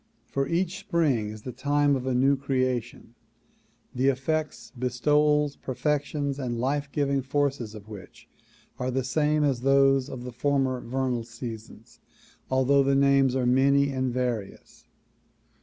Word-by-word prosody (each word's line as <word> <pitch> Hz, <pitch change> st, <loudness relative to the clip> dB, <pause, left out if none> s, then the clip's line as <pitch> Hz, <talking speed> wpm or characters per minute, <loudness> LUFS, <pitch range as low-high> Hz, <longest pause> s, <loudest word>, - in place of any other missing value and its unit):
For 135 Hz, 0 st, -2 dB
each 180 Hz, +3 st, -1 dB
spring 155 Hz, -, 0 dB
is 110 Hz, 0 st, -9 dB
the 130 Hz, -, -5 dB
time 145 Hz, +1 st, +1 dB
of 130 Hz, 0 st, -4 dB
a 130 Hz, -, 0 dB
new 135 Hz, +3 st, +4 dB
creation, 130 Hz, -4 st, -2 dB, 0.8 s
the 130 Hz, +2 st, +1 dB
effects, 150 Hz, +3 st, -1 dB
bestowals, 150 Hz, +4 st, +1 dB
perfections 145 Hz, +1 st, -2 dB
and 120 Hz, -3 st, -3 dB
life 140 Hz, +3 st, -1 dB
giv 140 Hz, -1 st, 0 dB
ing 140 Hz, -1 st, +1 dB
forces 135 Hz, -4 st, -1 dB
of 105 Hz, -1 st, -11 dB
which 105 Hz, -4 st, -12 dB, 0.5 s
are 125 Hz, 0 st, -1 dB
the 130 Hz, +1 st, -1 dB
same 150 Hz, +4 st, +1 dB
as 135 Hz, -4 st, +1 dB
those 135 Hz, 0 st, +3 dB
of 125 Hz, -2 st, -7 dB
the 125 Hz, -, -6 dB
former 130 Hz, 0 st, 0 dB
vernal 125 Hz, -1 st, -2 dB
seasons 115 Hz, -1 st, -10 dB, 0.5 s
although 130 Hz, +2 st, +3 dB
the 135 Hz, 0 st, +2 dB
names 135 Hz, -1 st, +3 dB
are 130 Hz, -2 st, 0 dB
many 140 Hz, +3 st, +3 dB
and 130 Hz, -1 st, -1 dB
various. 120 Hz, -5 st, -4 dB
135 Hz, 145 wpm, -26 LUFS, 125-140 Hz, 0.8 s, new